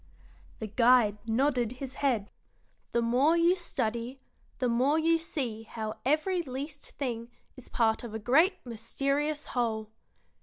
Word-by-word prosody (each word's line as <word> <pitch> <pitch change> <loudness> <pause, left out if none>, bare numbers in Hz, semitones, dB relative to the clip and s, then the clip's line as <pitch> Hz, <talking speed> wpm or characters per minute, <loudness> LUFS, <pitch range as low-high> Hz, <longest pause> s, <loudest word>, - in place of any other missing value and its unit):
The 220 - -5
guide 225 -1 +4
nodded 245 0 +1
his 255 0 -7
head. 235 -8 +1 0.6
"The 235 - +1
more 265 +8 +3
you 340 +2 +4
study, 240 -7 -3 0.4
the 255 - 0
more 255 +6 +2
you 330 +1 +3
see 255 -9 -3
how 220 -1 -6
every 310 +7 +1
least 285 +1 -7
thing 235 -4 -3 0.3
is 255 - -13
part 225 -1 +1
of 225 -2 -6
a - - 0
great 280 - +4
mysterious 275 +6 -1
whole. 220 -3 -1
250 Hz, 140 wpm, -29 LUFS, 230-290 Hz, 0.6 s, guide